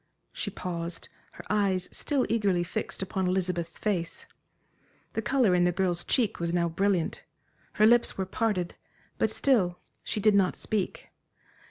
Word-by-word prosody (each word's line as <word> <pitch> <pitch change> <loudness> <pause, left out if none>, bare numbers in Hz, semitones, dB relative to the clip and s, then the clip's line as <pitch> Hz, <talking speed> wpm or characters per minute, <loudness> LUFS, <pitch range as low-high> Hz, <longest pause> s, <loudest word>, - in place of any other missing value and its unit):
She 205 - -3
paused, 170 -3 -5 0.2
her - - -11
eyes 195 -3 +1
still 280 -4 0
eagerly 200 -6 +1
fixed 180 +2 -4
upon 190 0 -1
Elizabeth's 180 -2 -1
face. 175 -6 -2 0.9
The 225 - -1
color 240 -4 +3
in 175 0 +4
the 175 - +3
girl's 175 -1 0
cheek 240 -6 +1
was 170 0 -1
now 170 -1 +2
brilliant, 180 0 0 0.5
her 215 - +4
lips 240 +1 +4
were 190 - -1
parted; 190 -3 -1 0.5
but - - +3
still 190 -11 +2 0.3
she - - -2
did 215 +1 +4
not 195 -2 +3
speak. 210 -4 -3
190 Hz, 150 wpm, -28 LUFS, 175-215 Hz, 0.9 s, in